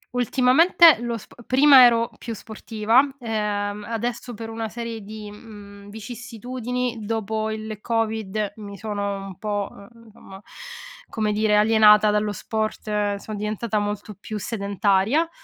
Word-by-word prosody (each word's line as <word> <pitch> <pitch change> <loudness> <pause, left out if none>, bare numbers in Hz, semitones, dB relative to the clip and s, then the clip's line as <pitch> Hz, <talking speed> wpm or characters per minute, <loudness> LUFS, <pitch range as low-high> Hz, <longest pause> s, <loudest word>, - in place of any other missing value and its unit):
Ultimamente 270 +6 +5
lo 240 -1 -3
sp 225 +2 -12
prima 265 -1 +8
ero 230 0 +3
più 230 - -6
sportiva, 220 +2 +1 0.2
ehm, 210 -3 -3
adesso 235 +1 -4
per 225 +1 -7
una 225 0 -4
serie 230 0 -6
di, 210 0 -9
mhmm, 205 -2 -13
vicissitudini, 245 +2 -5
dopo 220 0 -2
il 215 -1 -6
Covid 220 -2 -2
mi 200 -2 -9
sono 200 -1 -4
un 190 -3 -10
po', 205 -2 -3
uhm, 230 +2 -16
insomma, 195 -3 -13 0.7
come 215 -1 -1
dire, 210 0 +2
alienata 210 0 +6
dallo 210 0 0
sport, 210 -1 -2
son 205 +1 -7
diventata 215 +1 -2
molto 205 0 -4
più 210 +2 -7
sedentaria, 205 - 0
215 Hz, 130 wpm, -23 LUFS, 205-230 Hz, 0.7 s, prima